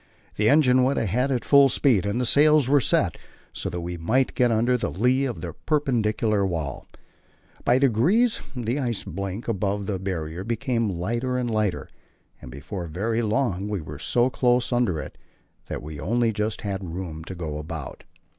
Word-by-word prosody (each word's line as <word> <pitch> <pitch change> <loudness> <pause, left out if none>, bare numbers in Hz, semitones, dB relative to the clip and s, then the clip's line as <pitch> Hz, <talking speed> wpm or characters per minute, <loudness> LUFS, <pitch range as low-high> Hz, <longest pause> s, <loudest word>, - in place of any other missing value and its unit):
The 110 +1 +2
engine 130 -3 +5
went 130 +2 +2
ahead 125 +6 0
at 125 -4 -1
full 140 -1 +6
speed, 115 -10 +2
and 105 +4 -1
the 125 - 0
sails 150 +1 +4
were 140 +1 +4
set, - - +1 0.4
so - - -4
that 90 - -4
we 85 +1 -5
might 125 +11 +1
get 125 -1 +3
under 115 +2 +2
the 125 - -1
lee 125 +7 +1
of 125 - -4
the - - -5
perpendicular 115 -8 0
wall. 80 -7 -3 0.8
By 125 - +4
degrees 140 - +3
the 120 +2 -2
ice 120 -6 -2
blink 100 +3 -5
above 100 -2 -1
the 95 -2 -2
Barrier 85 -2 -4
became 115 0 -1
lighter 115 +8 -2
and 120 -2 -1
lighter, 105 -4 -1 0.5
and - - -10
before 80 - -6
very 110 +8 -1
long 105 -4 0
we 105 -2 -2
were 75 -2 -8
so 120 +10 +2
close 125 0 +1
under 115 -10 +1
it - - -8 0.5
that - - -5
we 75 -1 -8
only 115 +7 +1
just 105 +1 -2
had 95 -4 -4
room 80 -4 -6
to 95 - -7
go 80 -4 -4
about. 75 -2 -7
110 Hz, 180 wpm, -24 LUFS, 95-125 Hz, 0.8 s, full